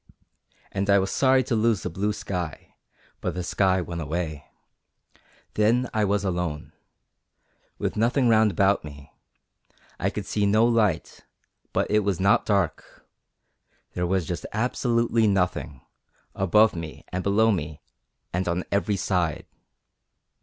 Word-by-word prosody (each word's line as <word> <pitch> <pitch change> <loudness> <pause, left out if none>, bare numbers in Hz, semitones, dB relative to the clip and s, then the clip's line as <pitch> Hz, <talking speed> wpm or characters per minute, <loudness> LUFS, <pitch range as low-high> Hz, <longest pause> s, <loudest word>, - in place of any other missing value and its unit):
And 100 +1 -2
I 100 - +6
was 95 0 0
sorry 130 -1 +3
to 130 - -3
lose 110 -2 +1
the - - -2
blue 100 +5 -1
sky, 90 -6 -5 0.5
but - - -3
the 90 - -3
sky 95 +1 +1
went 85 -1 -5
away. 80 -1 -4 1.1
Then 115 +4 +2
I 110 -1 +2
was 100 0 0
alone, 90 -5 -3 1.0
with - - -2
nothing 120 +4 +2
round 110 -1 +5
about 100 0 +2
me; 70 -2 -11 0.9
I - - +1
could - - -5
see 105 -1 0
no 110 +3 +4
light, 110 -8 0 0.5
but - - +1
it 105 - +4
was 100 -4 -1
not 100 +2 +3
dark 100 -6 -1 0.9
there 90 0 -1
was 95 -1 0
just 85 +2 -4
absolutely 115 0 +1
nothing, 90 -8 -1 0.5
above 105 +3 +3
me 85 -2 -7
and 90 - -3
below 110 +4 +3
me 80 -6 -4 0.5
and 90 +1 -1
on 90 +1 -1
every 100 +1 +1
side. 90 -5 -1
100 Hz, 140 wpm, -25 LUFS, 90-110 Hz, 1.1 s, I